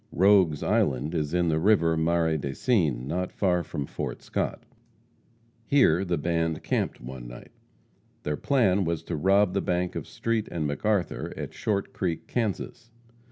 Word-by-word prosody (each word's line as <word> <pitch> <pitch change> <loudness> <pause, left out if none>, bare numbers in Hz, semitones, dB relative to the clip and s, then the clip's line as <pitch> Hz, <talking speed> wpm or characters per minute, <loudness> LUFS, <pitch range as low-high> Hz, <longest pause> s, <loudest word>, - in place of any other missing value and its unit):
Rogue's 95 -5 +4
Island 70 +4 +1
is 75 -3 -1
in 90 -1 +1
the 80 0 +1
river 85 -3 +3
Marais 80 0 +1
des 70 -2 -4
Cygnes, 80 - +1
not 90 +4 -2
far 90 -3 +1
from 70 -2 -4
Fort - - -5
Scott. - - -3 1.0
Here 95 - +4
the 90 -3 -1
band 80 0 -1
camped - - -1
one 60 0 -8
night. - - -11 0.7
Their 75 - -1
plan 100 -9 +2
was 85 -2 -2
to 85 - -4
rob 95 +4 +3
the 100 - +1
bank 90 0 -1
of - - -5
Street 115 -2 -1
& - - -13
McArthur 85 +5 -1
at - - -5
Short 100 -2 -2
Creek, 85 -4 -2
Kansas. 115 +1 -3
85 Hz, 160 wpm, -27 LUFS, 80-100 Hz, 1.0 s, Rogue's